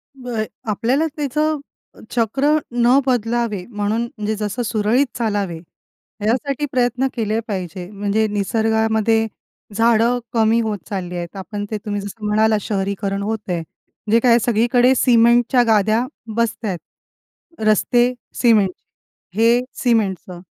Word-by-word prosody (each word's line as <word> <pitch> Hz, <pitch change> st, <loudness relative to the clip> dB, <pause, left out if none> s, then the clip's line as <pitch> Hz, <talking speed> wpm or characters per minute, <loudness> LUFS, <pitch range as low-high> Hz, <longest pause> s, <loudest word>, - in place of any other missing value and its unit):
होय, 245 Hz, -4 st, -3 dB, 0.2 s
आपल्याला 245 Hz, +9 st, +1 dB
त्याचं, 300 Hz, +1 st, 0 dB, 0.5 s
चक्र 270 Hz, +6 st, +2 dB
न 245 Hz, +2 st, +4 dB
बदलावे 235 Hz, -5 st, 0 dB
म्हणून 210 Hz, 0 st, -1 dB
म्हणजे 220 Hz, -4 st, -4 dB
जसं 210 Hz, +3 st, -3 dB
सुरळीत 225 Hz, +4 st, +2 dB
चालावे, 205 Hz, -7 st, -1 dB, 0.7 s
यासाठी 275 Hz, +5 st, 0 dB
प्रयत्न 250 Hz, +1 st, +1 dB
केले 220 Hz, -2 st, -1 dB
पाहिजे. 180 Hz, -3 st, -5 dB
म्हणजे 205 Hz, +2 st, 0 dB
निसर्गामध्ये, 220 Hz, +2 st, +1 dB, 0.5 s
झाडं 230 Hz, +2 st, +3 dB
कमी 225 Hz, 0 st, +3 dB
होत 215 Hz, -2 st, -2 dB
चालली 180 Hz, -4 st, -4 dB
आहेत. 175 Hz, +2 st, -6 dB
आपण 205 Hz, +2 st, -5 dB
ते 215 Hz, -, -1 dB
तुम्ही 205 Hz, -1 st, -2 dB
जसं 205 Hz, +2 st, -8 dB
म्हणालात 215 Hz, +1 st, +3 dB
शहरीकरण 195 Hz, 0 st, -2 dB
होत 220 Hz, -1 st, -4 dB
आहे. 170 Hz, -2 st, -1 dB, 0.5 s
जे 230 Hz, -, +6 dB
काय 235 Hz, 0 st, +4 dB
सगळीकडे 240 Hz, +3 st, +3 dB
सिमेंटच्या 240 Hz, +1 st, +4 dB
गाद्या 220 Hz, +2 st, +3 dB, 0.3 s
बसत 235 Hz, 0 st, -1 dB
आहेत. 185 Hz, -5 st, -2 dB, 0.9 s
रस्ते 240 Hz, +3 st, +3 dB, 0.3 s
सिमेंट, 215 Hz, -6 st, +4 dB, 0.6 s
हे 230 Hz, +3 st, +4 dB, 0.2 s
सिमेंटचं. 195 Hz, -7 st, 0 dB
220 Hz, 120 wpm, -20 LUFS, 205-240 Hz, 0.9 s, जे